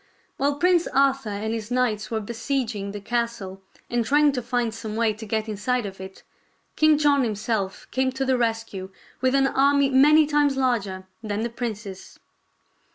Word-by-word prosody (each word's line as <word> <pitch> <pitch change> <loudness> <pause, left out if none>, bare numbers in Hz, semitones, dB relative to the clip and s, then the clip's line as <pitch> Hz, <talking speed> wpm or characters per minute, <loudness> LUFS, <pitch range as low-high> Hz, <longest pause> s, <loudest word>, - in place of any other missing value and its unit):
While 280 +1 +1
Prince 350 +1 +3
Arthur 270 -3 +2
and 210 +2 -3
his 220 -1 -5
knights 230 -4 0
were 225 - -1
besieg 235 +2 -2
ing 200 0 -4
the 205 +1 -6
castle 215 -3 -3 0.3
and 240 -1 0
trying 290 +4 +4
to 255 -2 -3
find 240 -1 -1
some 220 -1 -6
way 225 -1 +2
to 220 +1 -10
get 220 +1 -1
inside 220 +3 -1
of 195 -1 -8
it. 190 0 -10 0.5
King 310 -1 +4
John 290 -2 +3
himself 210 -3 -2
came 260 0 +1
to 270 0 -2
the 260 0 +2
rescue 225 -5 -2 0.3
with 260 +1 +2
an 270 0 +4
army 280 +1 +3
many 300 +4 +6
times 290 -2 +2
larger 210 -8 -1 0.2
than 210 -1 -3
the 235 0 -2
prince's. 210 -5 -6
235 Hz, 175 wpm, -24 LUFS, 215-270 Hz, 0.5 s, many